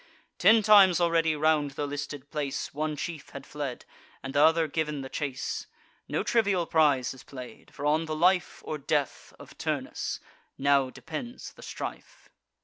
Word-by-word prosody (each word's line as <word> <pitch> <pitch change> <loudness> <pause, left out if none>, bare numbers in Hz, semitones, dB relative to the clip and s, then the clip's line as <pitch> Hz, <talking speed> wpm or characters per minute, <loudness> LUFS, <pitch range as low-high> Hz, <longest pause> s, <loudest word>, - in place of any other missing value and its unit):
Ten 220 0 +6
times 195 -5 +7
already 165 -2 +2
round 150 -2 +2
the 145 - -1
listed 145 -1 -6
place 145 -3 -3
One 155 +1 -2
chief 160 0 -6
had 140 - -9
fled, 145 -4 -5 0.4
and 135 0 -5
t' 145 - +2
other 160 +1 +5
giv'n 150 -2 -2
the 130 - -7
chase: 140 0 -3 0.4
No - - 0
trivial 200 -7 +2
prize 145 -7 +3
is 130 - -13
play'd; 130 -3 -11
for 145 - -6
on 155 +2 +2
the 155 -1 -3
life 180 +3 +2
Or 155 - -4
death 145 0 -1
of - - -14
Turnus - - -3 0.4
now 140 -1 +3
depends 160 - -7
the - - -15
strife. - - -8
150 Hz, 160 wpm, -28 LUFS, 140-165 Hz, 0.4 s, times